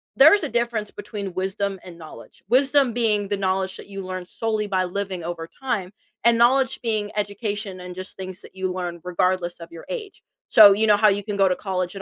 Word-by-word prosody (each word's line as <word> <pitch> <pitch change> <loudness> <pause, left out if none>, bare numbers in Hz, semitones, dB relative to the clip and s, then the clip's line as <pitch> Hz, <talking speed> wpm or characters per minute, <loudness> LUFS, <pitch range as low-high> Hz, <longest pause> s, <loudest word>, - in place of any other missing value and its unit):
there 305 +6 +8
is 405 -5 +3
a 295 - -2
difference 235 -3 -1
between 200 -2 -6
wisdom 195 +1 -2
and 175 -2 -11
knowledge, 160 -2 -13
wisdom 270 -1 +3
being 210 -4 +1
the 205 0 -1
knowledge 190 -1 -1
that - - -11
you 195 -1 -7
learn 185 -1 -5
solely 215 +1 -2
by 185 -2 +1
living 185 -1 -4
over 165 -1 -5
time, 220 -8 -2 0.3
and 235 -1 +5
knowledge 260 +2 +3
being 215 -3 -1
education 205 -1 -3
and 180 0 -8
just 185 +1 -8
things 190 +1 -7
that - - -14
you 190 -1 -2
learn, 175 -2 -5
regardless 180 -1 0
of 170 0 -11
your 165 - -11
age, 430 -5 -6 0.3
so 205 -3 +9
you 220 +2 +1
know, 210 -1 +5
how 215 - +5
you 200 0 +2
can 205 -1 -4
go 195 -1 +4
to 180 - +1
college 185 -1 -3
at 195 - -6
200 Hz, 220 wpm, -23 LUFS, 185-220 Hz, 0.3 s, so